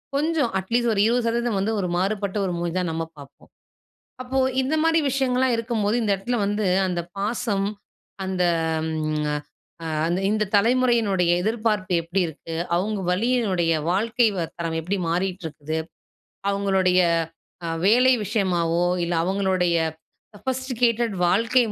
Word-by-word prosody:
கொஞ்சம் 300 Hz, -3 st, +1 dB
அட்லீஸ்ட் 235 Hz, +5 st, 0 dB
ஒரு 200 Hz, -, +2 dB
20% 235 Hz, -1 st, 0 dB
வந்து 210 Hz, +3 st, 0 dB
ஒரு 185 Hz, -, -1 dB
மாறுபட்ட 200 Hz, +2 st, -1 dB
ஒரு 180 Hz, -, -2 dB
மூஞ்சி 170 Hz, -1 st, -2 dB
தான் 180 Hz, -2 st, 0 dB
நம்ம 165 Hz, 0 st, -2 dB
பாப்போம். 140 Hz, -1 st, -15 dB, 0.7 s
அப்போ 260 Hz, +1 st, -2 dB, 0.2 s
இந்த 270 Hz, +4 st, -1 dB
மாரி 325 Hz, 0 st, +4 dB
விஷயங்கள்லாம் 260 Hz, -1 st, +1 dB
இருக்கும்போது, 225 Hz, -2 st, 0 dB
இந்த 215 Hz, -, 0 dB
இடத்ல 240 Hz, +6 st, -2 dB
வந்து 205 Hz, 0 st, 0 dB, 0.2 s
அந்த 180 Hz, -2 st, -1 dB, 0.2 s
பாசம், 205 Hz, -1 st, -1 dB, 0.6 s
அந்த 185 Hz, -1 st, 0 dB, 0.5 s
ம்ங்அ 155 Hz, -1 st, -1 dB, 0.5 s
அ -, -, -4 dB, 0.2 s
அந்த் 175 Hz, +3 st, 0 dB
இந்த 215 Hz, 0 st, +1 dB
தலைமுறையினுடைய 225 Hz, -5 st, +3 dB
எதிர்பார்ப்பு 215 Hz, -3 st, 0 dB
எப்புடி 175 Hz, +4 st, -1 dB
இருக்கு? 160 Hz, +1 st, -8 dB, 0.2 s
அவுங்க 205 Hz, +3 st, -1 dB
வழியினுடைய 195 Hz, -5 st, +1 dB, 0.2 s
வாழ்க்கை 230 Hz, +5 st, +2 dB, 0.3 s
தரம் 165 Hz, -1 st, -2 dB
எப்படி 180 Hz, +5 st, -2 dB
மாறிட்ருக்குது? 165 Hz, -4 st, -3 dB, 0.7 s
அவங்களுடைய 190 Hz, -2 st, +2 dB, 0.7 s
அ -, -, -2 dB, 0.2 s
வேலை 250 Hz, +5 st, +5 dB
விஷயமாவோ, 175 Hz, -5 st, +1 dB, 0.2 s
இல்ல 170 Hz, +1 st, -1 dB
அவங்களுடைய 185 Hz, -2 st, +1 dB, 0.6 s
சொஃபஸ்ட்டிகேட்டட் 240 Hz, 0 st, -1 dB
வாழ்க்கை 230 Hz, +7 st, +3 dB
200 Hz, 125 wpm, -23 LUFS, 180-235 Hz, 0.7 s, வேலை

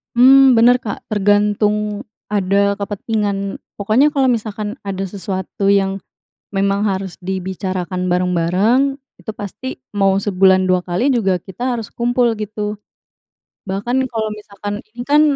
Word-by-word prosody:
Mmm, 265 Hz, +1 st, +7 dB
bener, 240 Hz, +2 st, +5 dB
Kak. 220 Hz, -5 st, -6 dB
Tergantung 210 Hz, +1 st, +1 dB, 0.2 s
ada 200 Hz, 0 st, +1 dB
kepentingan 200 Hz, -1 st, -2 dB, 0.2 s
pokoknya 235 Hz, +9 st, +2 dB
kalau 265 Hz, -2 st, +3 dB
misalkan 215 Hz, 0 st, -3 dB
ada 195 Hz, -1 st, -3 dB
sesuatu 190 Hz, 0 st, -4 dB
yang 195 Hz, -1 st, +2 dB, 0.5 s
memang 200 Hz, 0 st, 0 dB
harus 195 Hz, -3 st, -2 dB
dibicarakan 185 Hz, -1 st, -3 dB
bareng-bareng, 185 Hz, +10 st, +2 dB, 0.2 s
itu 220 Hz, -, -5 dB
pasti 215 Hz, +5 st, -7 dB, 0.2 s
mau 195 Hz, -1 st, +3 dB
sebulan 190 Hz, -1 st, +3 dB
2 185 Hz, -1 st, +2 dB
kali 225 Hz, +11 st, 0 dB
juga, 195 Hz, -6 st, +1 dB
kita 240 Hz, +8 st, -4 dB
harus 225 Hz, -, -7 dB
kumpul, 240 Hz, 0 st, +1 dB
gitu. 210 Hz, 0 st, -4 dB, 0.9 s
Bahkan, 240 Hz, +7 st, -1 dB
kalau 220 Hz, -3 st, -2 dB
misalkan, 205 Hz, -1 st, -7 dB, 0.2 s
ini 240 Hz, -, -7 dB
kan 295 Hz, +1 st, +4 dB
205 Hz, 125 wpm, -18 LUFS, 195-230 Hz, 0.9 s, Mmm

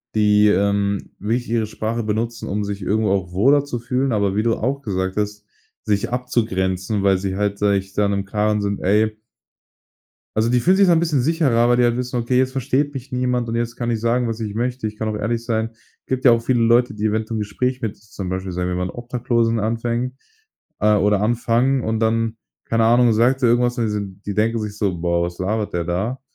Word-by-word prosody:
die, 105 Hz, -1 st, +4 dB
ähm, 100 Hz, 0 st, +1 dB
wirklich 115 Hz, +4 st, -2 dB
ihre 115 Hz, -2 st, +1 dB
Sprache 110 Hz, +2 st, -3 dB
benutzen, 115 Hz, +2 st, -2 dB
um 105 Hz, +2 st, -2 dB
sich 100 Hz, 0 st, -4 dB
irgendwo 105 Hz, +2 st, +1 dB
auch 90 Hz, -3 st, -1 dB
wohler 135 Hz, +9 st, +4 dB
zu 125 Hz, -4 st, -4 dB
fühlen, 125 Hz, +2 st, -1 dB
aber 100 Hz, -2 st, +1 dB
wie 105 Hz, -, +2 dB
du 115 Hz, 0 st, +2 dB
auch 135 Hz, +5 st, -2 dB
gesagt 95 Hz, -5 st, -3 dB
hast, 105 Hz, 0 st, -3 dB, 0.4 s
sich 100 Hz, -1 st, 0 dB
abzugrenzen, 105 Hz, -5 st, -1 dB
weil 95 Hz, -1 st, +4 dB
sie 95 Hz, 0 st, -3 dB
halt 100 Hz, 0 st, -1 dB
sage 100 Hz, -1 st, +3 dB
ich, 95 Hz, 0 st, -11 dB
da 105 Hz, -, +1 dB
in 100 Hz, -, +1 dB
'nem 100 Hz, 0 st, -1 dB
Karren 105 Hz, +1 st, 0 dB
sind, 100 Hz, 0 st, -2 dB
ey 110 Hz, +3 st, +2 dB, 1.2 s
also, 110 Hz, +2 st, +2 dB
die 125 Hz, -, +3 dB
fühlen 185 Hz, +2 st, +4 dB
sich 195 Hz, -1 st, +5 dB
so 175 Hz, -, +6 dB
'n 165 Hz, -, +4 dB
bisschen 160 Hz, -6 st, +1 dB
sicherer, 130 Hz, -6 st, +2 dB
weil 120 Hz, -, +4 dB
die 125 Hz, -, +4 dB
halt 120 Hz, -1 st, +2 dB
wissen: 125 Hz, 0 st, -3 dB
„Okay, 125 Hz, +2 st, +1 dB
jetzt 130 Hz, 0 st, +1 dB
versteht 135 Hz, +2 st, 0 dB
mich 130 Hz, 0 st, -7 dB
niemand 125 Hz, -1 st, 0 dB
und 115 Hz, -, -2 dB
jetzt 120 Hz, 0 st, -2 dB
kann 120 Hz, -1 st, -1 dB
ich 115 Hz, -, -1 dB
sagen, 120 Hz, +2 st, +1 dB
was 115 Hz, -1 st, -3 dB
ich 105 Hz, -2 st, -4 dB
möchte. 120 Hz, 0 st, -2 dB
Ich 105 Hz, -, -8 dB
kann 110 Hz, -, -3 dB
auch 110 Hz, -, -2 dB
ehrlich 115 Hz, +2 st, -2 dB
sein.“ 110 Hz, -1 st, -1 dB, 0.4 s
Gibt 130 Hz, 0 st, -2 dB
ja 125 Hz, -, +8 dB
auch 115 Hz, 0 st, +3 dB
viele 120 Hz, +1 st, +1 dB
Leute, 120 Hz, 0 st, +3 dB
die 105 Hz, +1 st, -3 dB
eventuell 110 Hz, +1 st, -1 dB
'n -, -, -2 dB
Gespräch 125 Hz, +5 st, -2 dB
mit 110 Hz, -4 st, -3 dB
zum 100 Hz, -2 st, -7 dB
Beispiel, 95 Hz, 0 st, -3 dB
sagen 90 Hz, 0 st, -2 dB
wir 90 Hz, -, -2 dB
mal, 90 Hz, 0 st, -1 dB
'n -, -, -4 dB
Obdachlosen 120 Hz, 0 st, -1 dB
anfängt 115 Hz, +3 st, -2 dB, 0.7 s
oder 105 Hz, -1 st, +3 dB
anfangen 120 Hz, +4 st, +1 dB
und 110 Hz, 0 st, -1 dB
dann, 115 Hz, 0 st, 0 dB, 0.3 s
keine 115 Hz, 0 st, +1 dB
Ahnung, 120 Hz, 0 st, +5 dB
sagt 125 Hz, +5 st, +2 dB
der 120 Hz, -, +5 dB
irgendwas 120 Hz, +1 st, +2 dB
und 120 Hz, -, +1 dB
die 110 Hz, -, -1 dB
sind 100 Hz, -1 st, -5 dB
die 100 Hz, -, -3 dB
denken 115 Hz, +3 st, +1 dB
sich 105 Hz, -1 st, -5 dB
so: 95 Hz, -5 st, -1 dB
„Boah, 85 Hz, 0 st, +1 dB
was 85 Hz, 0 st, -6 dB
labert 105 Hz, +3 st, -1 dB
der 85 Hz, -, -1 dB
da?“ 95 Hz, +10 st, -2 dB
110 Hz, 230 wpm, -21 LUFS, 100-120 Hz, 1.2 s, ja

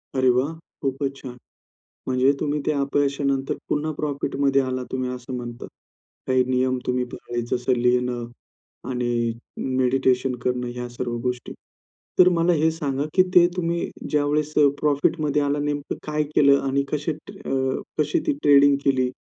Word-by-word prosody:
अरे 130 Hz, -1 st, +3 dB
वाह! 135 Hz, +6 st, +1 dB, 0.3 s
खूपच 135 Hz, 0 st, -2 dB
छान. 130 Hz, -2 st, -9 dB, 0.7 s
म्हणजे 130 Hz, +1 st, +3 dB
तुम्ही 150 Hz, 0 st, -1 dB
ते 155 Hz, -, +2 dB
अपयशानंतर 140 Hz, -1 st, 0 dB
पुन्हा 150 Hz, +1 st, 0 dB
प्रॉफिटमध्ये 140 Hz, -2 st, 0 dB
आलात 130 Hz, -1 st, -3 dB
तुम्ही 130 Hz, -1 st, -2 dB
असं 125 Hz, 0 st, -6 dB
म्हणता. 120 Hz, -1 st, -7 dB, 0.6 s
काही 130 Hz, -1 st, +3 dB
नियम 130 Hz, 0 st, +1 dB
तुम्ही 125 Hz, 0 st, 0 dB
पाळले, 120 Hz, 0 st, -4 dB
जसं 125 Hz, +1 st, 0 dB
लिहिणं 125 Hz, 0 st, +1 dB, 0.7 s
आणि 120 Hz, -2 st, 0 dB, 0.5 s
मेडिटेशन 130 Hz, 0 st, +2 dB
करणं 125 Hz, -1 st, -1 dB
या 125 Hz, 0 st, -4 dB
सर्व 120 Hz, 0 st, -4 dB
गोष्टी. 125 Hz, -1 st, -3 dB, 0.7 s
तर 180 Hz, -, +8 dB
मला 170 Hz, +1 st, +3 dB
हे 160 Hz, +1 st, +4 dB
सांगा, 145 Hz, -3 st, -2 dB
की 185 Hz, -, +6 dB
ते 175 Hz, -1 st, +8 dB
तुम्ही 170 Hz, -1 st, -1 dB, 0.2 s
ज्यावेळेस 150 Hz, 0 st, +1 dB
अ, 145 Hz, -1 st, +6 dB
प्रॉफिटमध्ये 150 Hz, 0 st, +1 dB
आला 145 Hz, +1 st, 0 dB
नेमकं 145 Hz, -1 st, -3 dB
काय 150 Hz, 0 st, 0 dB
केलं 140 Hz, -1 st, +5 dB
आणि 140 Hz, +1 st, +1 dB
कसे 150 Hz, +1 st, -1 dB
अ, 135 Hz, -3 st, -3 dB, 0.2 s
कशी 150 Hz, -1 st, +1 dB
ती -, -, +3 dB
ट्रेडिंग 140 Hz, -1 st, +6 dB
केली 130 Hz, -2 st, +2 dB
135 Hz, 145 wpm, -23 LUFS, 125-145 Hz, 0.7 s, तर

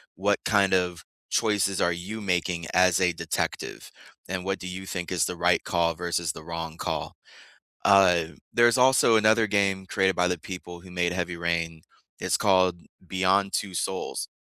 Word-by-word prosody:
what 100 Hz, +2 st, +1 dB
kind 100 Hz, -3 st, +3 dB
of 90 Hz, -2 st, 0 dB, 0.3 s
choices 100 Hz, -3 st, +1 dB
are 85 Hz, -, +2 dB
you 95 Hz, +6 st, -6 dB
making 90 Hz, -3 st, -1 dB
as 90 Hz, -1 st, +4 dB
a 90 Hz, -1 st, +3 dB
detective, 85 Hz, -1 st, -4 dB, 0.4 s
and 90 Hz, 0 st, -4 dB
what 95 Hz, 0 st, -2 dB
do 90 Hz, -, -7 dB
you 95 Hz, +1 st, -6 dB
think 90 Hz, -2 st, -5 dB
is 90 Hz, -4 st, +1 dB
the 90 Hz, -, -4 dB
right 85 Hz, +1 st, +2 dB
call 85 Hz, -1 st, +1 dB
versus 85 Hz, 0 st, -2 dB
the 80 Hz, -, -11 dB
wrong 80 Hz, -1 st, -6 dB
call. -, -, -4 dB, 0.7 s
Uh, 95 Hz, -4 st, +5 dB, 0.3 s
there's 120 Hz, +1 st, +4 dB
also 125 Hz, -3 st, +5 dB
another 110 Hz, +1 st, +4 dB
game 100 Hz, -2 st, +1 dB
created 95 Hz, 0 st, +1 dB
by 90 Hz, 0 st, +2 dB
the 90 Hz, -1 st, -1 dB
people 90 Hz, 0 st, -8 dB
who 95 Hz, -, -14 dB
made 90 Hz, -1 st, 0 dB
Heavy 90 Hz, -1 st, -3 dB
Rain, 85 Hz, -1 st, -2 dB, 0.4 s
it's -, -, 0 dB
called 95 Hz, -3 st, +3 dB, 0.3 s
Beyond: 95 Hz, +2 st, +1 dB
Two 95 Hz, -2 st, -2 dB
Souls. 95 Hz, +1 st, -3 dB
90 Hz, 170 wpm, -26 LUFS, 85-100 Hz, 0.7 s, Uh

